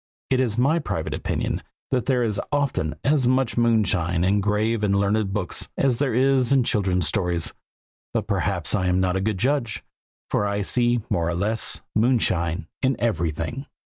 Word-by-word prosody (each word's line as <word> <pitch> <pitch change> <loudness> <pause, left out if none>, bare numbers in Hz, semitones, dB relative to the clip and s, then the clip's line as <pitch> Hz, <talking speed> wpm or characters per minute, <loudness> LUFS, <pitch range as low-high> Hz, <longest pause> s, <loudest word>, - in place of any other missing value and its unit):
It 130 - +3
is 120 -4 0
my 140 +7 +3
private 145 - -3
opinion - - -2 0.3
that 125 -3 0
there 125 -3 +2
is 105 -3 -1
often 140 - 0
as 140 -3 +2
much 130 -2 +1
moonshine 100 -8 +2
in 100 +2 +2
grave 105 +2 0
and 100 -1 +2
learned 100 0 +1
books 95 -3 -3
as 130 -4 +2
there 135 -5 0
is 130 0 +3
in 135 -2 +4
children's 95 -7 +1
stories; 90 -5 -1 0.6
but - - -1
perhaps - - -1
I 95 -3 +1
am 90 0 +2
not 95 -1 +1
a 95 - 0
good 105 0 -1
judge, 120 - -1 0.5
for 105 - +1
I 100 0 -1
see 120 +1 +2
more 85 -1 +1
or 85 - -1
less 105 +5 -1
moonshine 100 -7 +1
in 135 0 +2
everything. 105 - -2
110 Hz, 170 wpm, -24 LUFS, 95-125 Hz, 0.6 s, in